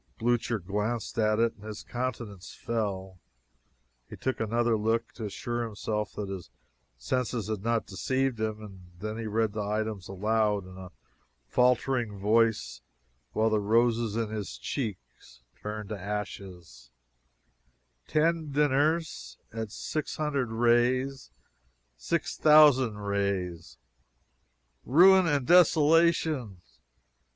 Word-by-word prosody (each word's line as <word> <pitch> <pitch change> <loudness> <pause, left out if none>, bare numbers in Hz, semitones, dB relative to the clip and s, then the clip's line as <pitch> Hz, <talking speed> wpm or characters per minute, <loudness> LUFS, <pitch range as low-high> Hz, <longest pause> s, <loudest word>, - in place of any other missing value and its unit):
Blucher 120 0 0
glanced 105 +5 -3
at 110 -1 +2
it 115 0 +2
and 105 - -18
his 110 -1 -7
countenance 120 -7 -5
fell. 95 -5 -3 0.9
He - - -9
took 130 - -2
another 115 +1 +1
look 110 +2 0
to 110 - -7
assure 120 +3 -3
himself 105 -1 -3
that 105 - -5
his 95 -3 -7 0.5
senses 125 -4 -2
had 110 -3 -2
not 115 0 0
deceived 130 +4 -1
him 110 -1 -3
and 95 -4 -12
then 110 +3 -5
read 110 -1 0
the 110 - -3
items 105 -2 -3
aloud, 105 0 0
in 95 0 -12
a 95 -1 -9 0.6
faltering 125 - +1
voice, 110 - +1 0.5
while 110 +1 +2
the 110 - +2
roses 115 +1 +2
in 115 -2 -1
his 105 -2 -5
cheeks 100 - -6 0.2
turned 105 -1 -5
to 105 -2 -5
ashes: 95 -9 -7 1.2
"'Ten 160 0 +1
dinners, 145 - 0 0.2
at 110 -1 -4
600 150 0 -3
reis, 120 - +1 0.7
6,000 130 - +4
reis!' 100 -4 -3 1.1
Ruin 185 +6 +6
and 145 -5 +1
desolation! 160 - +4
110 Hz, 110 wpm, -28 LUFS, 105-125 Hz, 1.2 s, Ruin